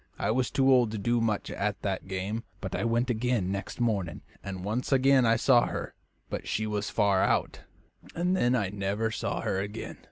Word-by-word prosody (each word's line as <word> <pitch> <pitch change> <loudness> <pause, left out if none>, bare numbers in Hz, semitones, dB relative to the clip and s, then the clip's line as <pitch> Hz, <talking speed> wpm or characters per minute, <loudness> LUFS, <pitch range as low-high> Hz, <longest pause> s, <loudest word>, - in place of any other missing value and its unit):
I - - 0
was 125 +2 +1
too 135 0 +3
old 125 -3 +5
to - - -2
do 120 +3 +1
much 110 -3 -1
at 100 -1 -2
that 95 -2 -2
game, 95 +4 -3 0.2
but 95 -3 -5
I - - -1
went 120 +2 +1
again 115 -5 0
next 100 +4 -5
morning, 100 -8 -1 0.2
and 95 -1 -6
once 115 +7 -2
again 135 -2 +5
I 115 - +5
saw 120 0 +4
her; - - -5 0.3
but - - -5
she 110 - -1
was 105 -1 -2
far 100 -2 +2
out, - - +1 0.6
and 180 +2 +1
then 125 -7 +2
I 105 -6 0
never 100 +3 -1
saw - - -2
her 95 - -1
again. 105 +3 -5
110 Hz, 200 wpm, -28 LUFS, 100-125 Hz, 0.6 s, old